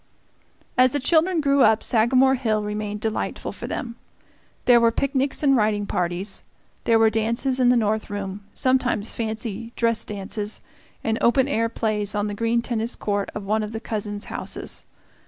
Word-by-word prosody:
As 255 0 +5
the 290 - +1
children 325 +5 +2
grew 280 -1 +3
up, 220 -1 +4
Sagamore 255 +3 +4
Hill 220 -5 0
remained 210 0 -4
delightful 220 -1 -2
for - - -7
them. 235 -1 -5 0.7
There 245 -1 +7
were 230 - +5
picnics 275 +3 0
and 275 -2 +5
riding 210 -3 +1
parties, 180 +2 -2 0.4
there 230 - +4
were 225 0 +4
dances 235 +4 0
in 250 -1 +4
the 250 - +5
north 215 -1 0
room 200 0 -5
sometimes 255 -5 +1
fancy 225 0 -4
dress 230 -1 +1
dances 205 +1 -5 0.4
and 225 0 0
open 260 +3 +4
air 230 -5 0
plays 210 -3 -1
on 205 0 0
the 205 - -3
green 230 +2 0
tennis 235 0 -2
court 205 -1 -2
of 210 - -4
one 215 +2 0
of 210 +1 -5
the 220 - -3
cousin's 210 -2 -4
houses. - - -3
225 Hz, 170 wpm, -23 LUFS, 210-250 Hz, 0.7 s, There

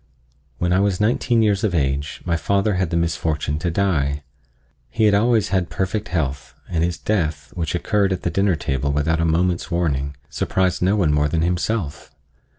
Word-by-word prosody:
When 90 0 0
I 90 - +3
was 100 -2 +1
nineteen 115 +1 +2
years 100 -2 +1
of 100 -5 +1
age 70 0 -1
my 85 -2 +1
father 100 +4 +1
had 90 -2 0
the 85 - 0
misfortune 80 -3 -1
to 85 - -1
die. 75 -6 0 0.7
He 110 - -1
had 105 -1 +5
always 110 0 +3
had 95 -3 0
perfect 95 +3 -2
health, 70 -5 -3
and 85 -2 0
his 85 0 -1
death, 75 -9 -2
which 85 -1 -2
occurred 100 +2 +1
at 95 - -2
the 85 - 0
dinner 100 -2 +2
table 70 -1 -1
without 80 +3 +1
a - - +1
moment's 85 +3 +1
warning, 70 -5 -1
surprised 95 -2 0
no 95 +3 +3
one 85 -8 +2
more 75 0 +2
than 80 +2 0
himself. 90 -1 -2
85 Hz, 185 wpm, -21 LUFS, 75-100 Hz, 0.7 s, had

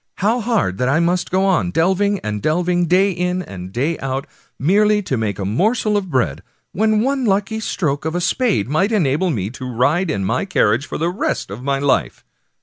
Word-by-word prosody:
How 220 +5 +1
hard 210 - 0
that 125 - +1
I 145 +4 +3
must 175 +1 0
go 190 +1 +1
on, 185 -2 +2
delving 190 +4 +1
and 105 -1 -4
delving, 175 - +1
day 190 +4 +3
in 180 +1 -2
and 95 - -9
day 140 +10 -1
out, 135 +1 -3 0.3
merely 210 +6 +3
to 140 - -2
make 110 -3 -2
a 100 - -3
morsel 210 - +1
of 195 -3 -1
bread, 95 - 0 0.3
when 215 +2 +2
one 270 +2 0
lucky 205 0 0
stroke 155 -9 -2
of 160 +2 -3
a 175 - 0
spade 200 - +1
might 185 - +1
enable 180 -3 +1
me 105 - -2
to 130 0 -7
ride 150 +10 +1
in 100 -10 -1
my 115 - 0
carriage 130 - +1
for - - -4
the 165 +2 0
rest 180 - -2
of 105 +5 -7
my 140 +1 0
life 140 0 0
175 Hz, 205 wpm, -19 LUFS, 130-195 Hz, 0.3 s, I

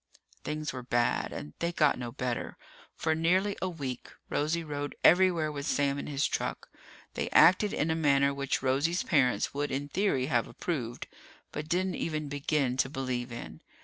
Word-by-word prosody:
Things 155 0 -3
were 130 - -5
bad, 120 -1 0
and 75 - -7
they 170 0 0
got 150 -6 +2
no 120 -1 -4
better. 125 -2 -3 0.4
For 160 - 0
nearly 185 +5 +2
a 185 - 0
week, 135 -8 -5 0.2
Rosie 160 +3 0
rode 145 -2 -4
everywhere 175 -3 +5
with 140 -1 -5
Sam 140 -1 +1
in - - -5
his 145 -1 0
truck. - - -3 0.4
They - - -2
acted 200 +3 +6
in 160 +2 0
a - - +1
manner 140 -3 +3
which 140 -1 -2
Rosie's 145 +7 +1
parents 130 - +2
would 145 +1 -1
in 140 +2 -3
theory 180 -8 +1
have 120 -5 +1
approved, 120 -9 -4 0.5
but 150 +1 -5
didn't 185 +2 +1
even 155 -2 -3
begin 140 -2 0
to 135 - +2
believe 130 -3 -3
in. 115 - -8
145 Hz, 175 wpm, -30 LUFS, 130-165 Hz, 0.5 s, acted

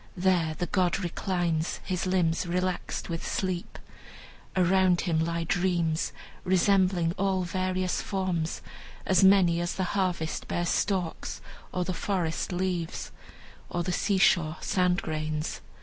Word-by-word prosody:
There 175 -4 +2
the 175 - -2
god 180 -1 +1
reclines, 175 -3 -1
his 185 0 -1
limbs 175 -2 +1
relaxed 180 +1 -2
with 165 -1 -4
sleep. 185 -2 -3 0.8
Around 185 -1 +4
him 165 -4 0
lie 170 0 -1
dreams, 175 -2 0 0.3
resembling 185 -2 +3
all 190 -1 +1
various 185 +1 -1
forms, 185 -5 -2 0.4
as 190 +1 +4
many 185 -3 +5
as 175 - -2
the 190 - -1
harvest 180 -5 -1
bears 175 0 -1
stalks, 185 -5 -1 0.3
or 180 - -1
the 185 - -2
forest 180 -3 -1
leaves, 180 -2 -2 0.6
or 175 - -1
the 180 - -2
seashore 175 -5 +2
sand 180 -2 +1
grains. 155 -1 -3
180 Hz, 125 wpm, -28 LUFS, 170-185 Hz, 0.8 s, many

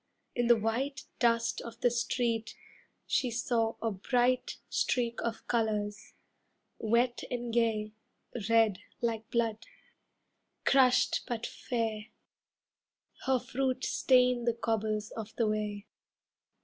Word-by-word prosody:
In 240 -1 +1
the 240 - +7
white 235 +6 -2
Dust 230 -1 +2
of 235 0 -9
the 245 - +4
street 235 -1 -1 0.5
she 255 - +1
saw 230 -1 0
a 225 - +1
bright 245 +5 +1
Streak 235 -2 0
of 230 -1 -4
colours, 210 -3 -1 0.6
wet 235 +2 +1
and 240 -2 -3
gay, 220 -2 +1 0.6
Red 225 -4 +4 0.2
like 225 -2 -2
blood. 225 -2 -1 1.0
Crushed 260 -2 +4
but 235 -1 -3
fair, 225 -3 -3 1.2
Her 265 -1 +4
fruit 260 +1 -2
stained 250 -2 +3
the 235 - +3
cobbles 215 -2 -1
of 220 -1 -7
the 230 - +1
way. 210 -1 -2
230 Hz, 110 wpm, -31 LUFS, 220-245 Hz, 1.2 s, the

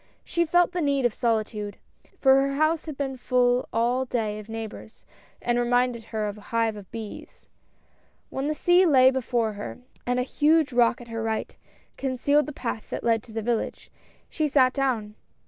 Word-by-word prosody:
She 340 0 0
felt 350 +2 +3
the 360 -1 -2
need 280 -3 +1
of 240 - +2
solitude, 215 -3 -1 0.4
for 270 0 +5
her 275 0 -1
house 310 +2 +1
had 305 -3 -6
been 270 -2 -3
full 250 0 +1
all 240 +3 +1
day 215 -4 -2
of 215 +1 -11
neigh 225 0 -4
bors, 220 +1 -12 0.4
and 240 0 +1
reminded 245 -1 +1
her 215 -2 -3
of 205 +1 -6
a 205 - -16
hive 230 -1 +1
of 200 -3 -11
bees. 220 -2 -9 0.8
When 270 +2 -2
the 305 - -1
sea 355 +4 +4
lay 260 -4 +6
before 240 -4 -1
her 205 0 -7 0.3
and 245 0 +1
a - - +1
huge 300 +2 +2
rock 240 0 +3
at 235 - -12
her 230 0 -4
right 220 0 -3 0.4
concealed 280 +3 +1
the - - -4
path 235 -5 -5
that - - -4
led 230 -2 +2
to 225 - -16
the 225 0 -4
village, 235 0 -2 0.4
she 310 - -1
sat 260 -3 +4
down. 245 -7 -1
245 Hz, 190 wpm, -26 LUFS, 225-275 Hz, 0.8 s, lay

